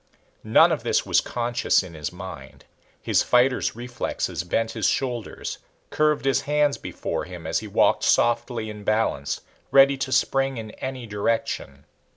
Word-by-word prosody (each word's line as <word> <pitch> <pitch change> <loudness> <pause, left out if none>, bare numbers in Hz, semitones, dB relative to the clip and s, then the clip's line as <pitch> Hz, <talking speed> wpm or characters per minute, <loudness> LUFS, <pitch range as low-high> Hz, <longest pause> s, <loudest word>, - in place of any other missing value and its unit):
None - - +5
of - - -1
this - - +1
was - - +3
conscious 120 -3 0
in 90 -2 -10
his 75 -2 -5
mind. 90 -7 -10 0.4
His - - +2
fighter's 125 0 +2
reflexes 120 -8 -3
bent 115 +6 -1
his 110 -4 0
shoulders, 125 -4 -3 0.3
curved 150 -2 +1
his 135 - +2
hands 150 -1 +1
before - - -4
him 90 -2 -9
as 80 - 0
he 110 - -8
walked 100 - +2
softly 120 -1 +2
in 105 -1 -8
balance, 105 -10 0 0.3
ready 140 0 +6
to 135 0 -3
spring 135 0 +1
in 110 -1 -6
any 130 0 -6
direction. 105 -10 -2
115 Hz, 155 wpm, -24 LUFS, 95-130 Hz, 0.4 s, ready